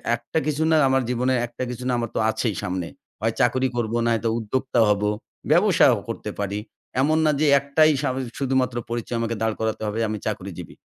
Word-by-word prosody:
একটা 120 +7 -2
কিছু 155 +1 0
না - - +5
আমার 135 0 +3
জীবনে 125 +1 +1
একটা 120 +2 -6
কিছু 125 0 -6
না - - +1
আমার 115 -1 -2
তো - - +1
আছেই 110 -2 -1
সামনে। 90 -2 -2 0.3
হয় 115 0 +1
চাকরি 130 +2 +2
করবো 120 -1 -1
নয়তো 115 0 +1
উদ্যোক্তা 120 +3 -1
হবো, 105 0 +2 0.4
ব্যবসাও - - +5
করতে - - -4
পারি। 100 +1 -2 0.4
এমন 155 +3 +3
না 155 - +4
যে 155 - +3
একটাই 155 +3 +3
স - - -8
আমি 130 - -3
যে 120 - -9
শুধুমাত্র 130 -2 +1
পরিচয় 120 0 -3
আমাকে 115 0 -1
দাঁড় 110 -1 0
করাতে 110 -1 -2
হবে 105 +2 -2
আমি 110 - -2
চাকরিজীবী। - - -5
120 Hz, 200 wpm, -23 LUFS, 110-130 Hz, 0.4 s, না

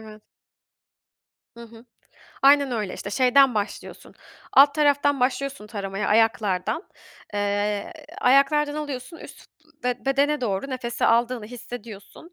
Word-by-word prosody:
Evet. 215 -1 -13 1.3
Hı 235 - -10
hı. 230 +1 -16 0.6
Aynen 280 -1 +5
öyle. 210 -5 -3
İşte, 200 - -7
şeyden 255 +1 +4
başlıyorsun, 205 0 -6 0.4
alt 285 +1 +6
taraftan 285 -2 +2
başlıyorsun 270 -2 -2
taramaya, 195 -2 -4
ayaklardan. 220 - +1 0.5
Eee, 205 - -1 0.3
ayaklardan 290 +3 +3
alıyorsun, 290 +1 -6
üst - - -13 0.4
b 250 +1 -2
bedene 280 +2 +1
doğru 220 +3 -3
nefesi 240 -2 -3
aldığını 235 -1 +1
hissediyorsun. 240 - -11
245 Hz, 110 wpm, -24 LUFS, 210-280 Hz, 1.3 s, alt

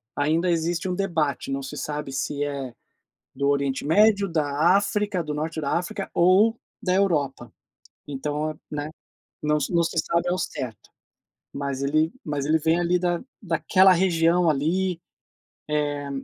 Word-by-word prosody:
ainda 160 +5 +1
existe 170 +1 0
um 180 - -1
debate, 160 -8 -1
não 135 - -2
se 150 +2 -7
sabe 150 0 -4
se 145 +2 -2
é 140 -4 -4 0.6
do 140 +1 0
Oriente 140 -1 0
Médio, 200 +4 +4
da 155 +3 +2
África, 205 -2 0
do 150 -2 -4
Norte 160 +2 -3
da 140 -2 -2
África 195 +2 -5
ou 195 +6 +4 0.3
da 185 - +1
Europa. 145 - 0 0.5
Então, 150 +2 -3
né, 150 0 -4 0.5
não 150 0 +2
s 145 - -2
não 170 - +4
se 165 - -3
sabe 170 +2 0
ao 180 - 0
certo, 130 -9 -5 0.6
mas 140 -1 -3
ele 155 +5 +1
mas 145 -2 -2
ele 160 +2 +3
vem 160 +2 +2
ali 175 +1 +2
da 175 -1 -1 0.5
daquela 190 0 +7
região 170 -1 +3
ali, 170 +5 0 0.7
eh 145 -1 -1
160 Hz, 150 wpm, -24 LUFS, 145-180 Hz, 0.7 s, daquela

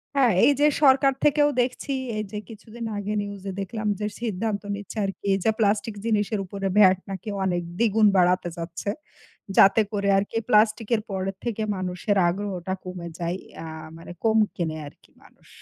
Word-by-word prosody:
হ্যাঁ? 255 -6 +4
এই - - +6
যে, 295 - +5 0.2
সরকার 270 0 +5
থেকেও 295 0 +4
দেখছি, 255 +3 -2 0.2
এই 215 - -1
যে, 210 - -4
কিছুদিন 230 +1 -9
আগে 205 +1 -3
নিউজ 205 -1 -7
এ - - -2
দেখলাম 215 +2 -4
যে, 210 - -2 0.2
সিদ্ধান্ত 215 -2 -2
নিচ্ছে 205 +2 -9
আরকি। 195 - -6
এই - - +2
যে, 220 - +4
প্লাস্টিক 210 +1 +1
জিনিসের 215 -1 +1
উপরে 195 +1 -4
ভ্যাট 190 -3 +7
নাকি 195 +2 -6 0.2
অনেক, 175 -2 0 0.2
দ্বিগুণ 220 -2 +4
বাড়াতে 180 0 +3
যাচ্ছে। 170 +3 -5 0.7
যাতে 195 +3 +7
করে 200 -1 -1
আরকি 205 +3 -1
প্লাস্টিকের 215 0 +3
পরের 190 0 -3
থেকে 225 -2 -2
মানুষের 185 +2 -2
আগ্রহটা 190 -1 -3
কমে 180 -2 -6
যায়। 170 +1 -2
ইয়া 165 - -9 0.3
মানে 165 +1 -10
কম 220 0 +4 0.2
কেনে 160 -3 -2
আরকি - - -21
মানুষ। - - -22
205 Hz, 170 wpm, -25 LUFS, 185-225 Hz, 0.7 s, ভ্যাট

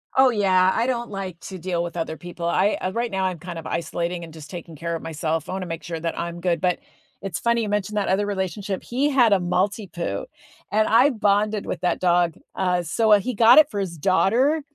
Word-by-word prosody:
Oh 265 0 +6
yeah, 190 -4 +3
I 235 +2 0
don't 240 -2 -2
like 190 -4 -6
to 190 - -7
deal 175 0 -2
with 175 0 -6
other 160 -1 -3
people, 175 -1 -6
I, 190 +4 +2
uh 185 - -1
right 235 +3 -2
now 190 -1 0
I'm 180 -3 -2
kind 175 -1 -7
of 160 - -8
isolating 170 +1 -3
and 165 -1 -10
just 150 -2 -11
taking 170 -1 -8
care 170 +2 -3
of 165 - -5
myself, 160 0 -3
I - - -3
wanna 190 -1 -3
make 165 -3 -6
sure 165 -1 -5
that 165 +1 -3
I'm 170 0 -4
good, 170 -2 0
but 180 -1 +1 0.4
it's 195 -2 -4
funny 235 0 +1
you 210 - -3
mentioned 210 0 -1
that 205 - 0
other 195 +2 +1
relationship, 195 0 -3
he 270 +5 0
had 245 -7 +4
a 195 - +4
Maltipoo, 180 - -2 0.5
and 215 +1 +2
I 230 +5 +5
bonded 210 -3 +1
with - - -4
that 180 -2 0
dog, 175 -2 +2 0.2
uh, 180 -2 +1
so, 220 +5 +1
uh, 205 - +8
he 250 +5 -3
got 230 +3 +6
it 305 -1 +5
for 205 - -4
his 175 -4 -4
daughter, 235 - +2
185 Hz, 235 wpm, -23 LUFS, 170-210 Hz, 0.5 s, uh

